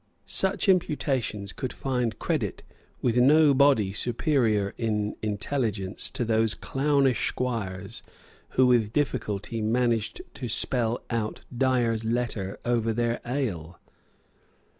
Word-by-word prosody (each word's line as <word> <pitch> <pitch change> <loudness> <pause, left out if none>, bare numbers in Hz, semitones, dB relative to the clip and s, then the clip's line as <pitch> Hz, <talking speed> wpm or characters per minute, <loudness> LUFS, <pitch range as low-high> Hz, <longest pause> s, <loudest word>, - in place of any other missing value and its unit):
Such 190 +2 -1
imputations 135 - 0
could 130 - -4
find 125 -4 -2
credit 135 - -2 0.4
with 120 -1 +2
no 145 +4 +6
body 130 -8 +4
superior 115 -3 +1
in 105 -2 -1
intelligence 105 -2 -2
to 120 - -2
those 110 -1 +2
clownish 135 -3 +1
squires 110 -5 -3 0.6
who 130 - +6
with 115 -4 +3
difficulty 115 -6 -1
managed 115 - 0
to 125 - -5
spell 120 +1 0
out 110 -2 -2
Dyer's 120 -3 +1
Letter 110 -4 -2
over 115 -2 +1
their 120 +1 -1
ale. 95 - -3
115 Hz, 110 wpm, -27 LUFS, 110-130 Hz, 0.6 s, no